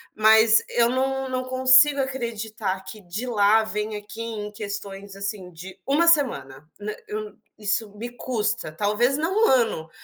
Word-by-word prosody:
Mas 220 Hz, +1 st, +5 dB
eu 235 Hz, 0 st, +2 dB
não 265 Hz, +1 st, -1 dB
não 255 Hz, 0 st, -2 dB
consigo 260 Hz, +2 st, +5 dB
acreditar 220 Hz, -7 st, -4 dB
que 215 Hz, -, -10 dB
de 195 Hz, +6 st, -6 dB
lá 220 Hz, -1 st, +4 dB
venha 210 Hz, 0 st, -4 dB
aqui 210 Hz, +2 st, -10 dB
em 215 Hz, -2 st, -5 dB
questões, 200 Hz, -2 st, -7 dB
assim, 195 Hz, -2 st, -5 dB
de 180 Hz, +3 st, -11 dB
1 300 Hz, +5 st, +3 dB
semana, 155 Hz, -, 0 dB
né, 210 Hz, +1 st, -4 dB
eu 215 Hz, 0 st, -5 dB, 0.2 s
isso 210 Hz, 0 st, -2 dB
me 235 Hz, +3 st, -5 dB
custa, 225 Hz, -9 st, -2 dB
talvez 210 Hz, -, +1 dB
não 375 Hz, +9 st, +1 dB
1 -, -, +3 dB
ano, 225 Hz, -11 st, +1 dB
220 Hz, 155 wpm, -24 LUFS, 205-255 Hz, 0.2 s, Mas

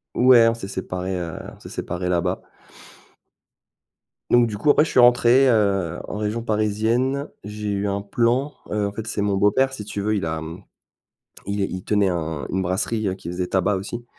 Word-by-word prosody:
Ouais, 125 Hz, -2 st, +6 dB
on 115 Hz, -, +3 dB
s'est 105 Hz, -4 st, -7 dB
séparés, 95 Hz, -1 st, -4 dB
heu, 85 Hz, -2 st, -5 dB, 0.2 s
on -, -, -21 dB
s'est -, -, -11 dB
séparés 90 Hz, +1 st, -4 dB
là-bas. 90 Hz, +1 st, 0 dB, 1.9 s
Donc, 120 Hz, -1 st, +5 dB
du 105 Hz, -2 st, -5 dB
coup, 145 Hz, +8 st, +4 dB
après 150 Hz, -, +4 dB
je -, -, -5 dB
suis -, -, +2 dB
rentré, 120 Hz, +2 st, +6 dB
heu, 100 Hz, -6 st, +1 dB
en -, -, -5 dB
région 110 Hz, +2 st, -2 dB
parisienne. 115 Hz, +5 st, 0 dB
J'ai 105 Hz, 0 st, -5 dB
eu 100 Hz, 0 st, -1 dB
un 100 Hz, 0 st, -1 dB
plan, 120 Hz, +7 st, 0 dB, 0.2 s
heu, 105 Hz, -1 st, 0 dB
en -, -, -4 dB
fait 110 Hz, +2 st, -6 dB
c'est 105 Hz, -, -3 dB
mon 100 Hz, -1 st, +1 dB
beau-père 130 Hz, +7 st, +3 dB
si 105 Hz, -6 st, -7 dB
tu 105 Hz, -1 st, -4 dB
veux 105 Hz, +1 st, 0 dB
il 95 Hz, -, -1 dB
a, 80 Hz, 0 st, -3 dB
mmh, 80 Hz, +1 st, -8 dB, 0.8 s
il 100 Hz, 0 st, -2 dB
il 95 Hz, -1 st, -3 dB
tenait 105 Hz, -2 st, +2 dB
un 80 Hz, -3 st, -3 dB
une 95 Hz, +1 st, -1 dB
brasserie 95 Hz, +2 st, -1 dB
qui 85 Hz, -, -8 dB
faisait 90 Hz, +1 st, -3 dB
tabac, 95 Hz, +2 st, +1 dB
aussi 120 Hz, +5 st, -6 dB
105 Hz, 195 wpm, -22 LUFS, 95-115 Hz, 1.9 s, Ouais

